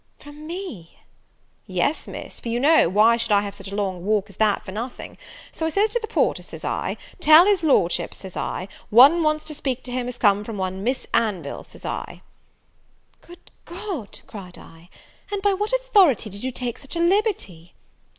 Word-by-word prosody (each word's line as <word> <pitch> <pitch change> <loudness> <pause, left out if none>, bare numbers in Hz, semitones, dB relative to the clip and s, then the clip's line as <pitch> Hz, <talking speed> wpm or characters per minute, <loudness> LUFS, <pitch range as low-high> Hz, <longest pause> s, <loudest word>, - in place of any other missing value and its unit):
"From 295 +1 -12
me!" 335 - -7 0.7
"Yes, - - -1
Miss, - - -8
for 235 - -6
you 235 +1 0
know, 295 - +5
why 215 +5 +5
should 230 -1 -2
I 200 -1 +5
have 200 -1 -5
such 195 - -9
a - - -4
long 190 -4 -2
walk 205 0 0
as 195 - -17
that 215 -2 +1
for 190 - -7
nothing? 235 +5 -6 0.4
So 320 - -2
I - - 0
says 405 +6 +1
to 480 - 0
the 440 - -6
porter, - - +1
says - - -9
I, - - -2 0.2
tell 315 +1 +8
his 405 -3 +3
Lordship, 265 - +1
says 190 -2 -9
I, 185 - -3 0.2
one 275 +10 +7
wants 305 -1 +1
to 310 - -6
speak 265 -3 -3
to 250 - -8
him 245 0 -2
as 250 - -6
comes 205 +1 +2
from 225 -3 -5
one 190 0 -3
Miss 255 +4 -1
Anville, 185 -10 -1
says - - -13
I." - - -5 1.0
"Good 350 +1 -16
God," 345 - -6
cried 185 -4 -10
I, 165 +2 -16 0.4
"and 405 - -1
by 405 -1 +3
what 415 +4 -2
authority 400 - +3
did 200 +2 -9
you 260 - -2
take 245 -1 -5
such 275 +4 -8
a - - -2
liberty?" 340 - 0
245 Hz, 200 wpm, -23 LUFS, 200-335 Hz, 1.0 s, tell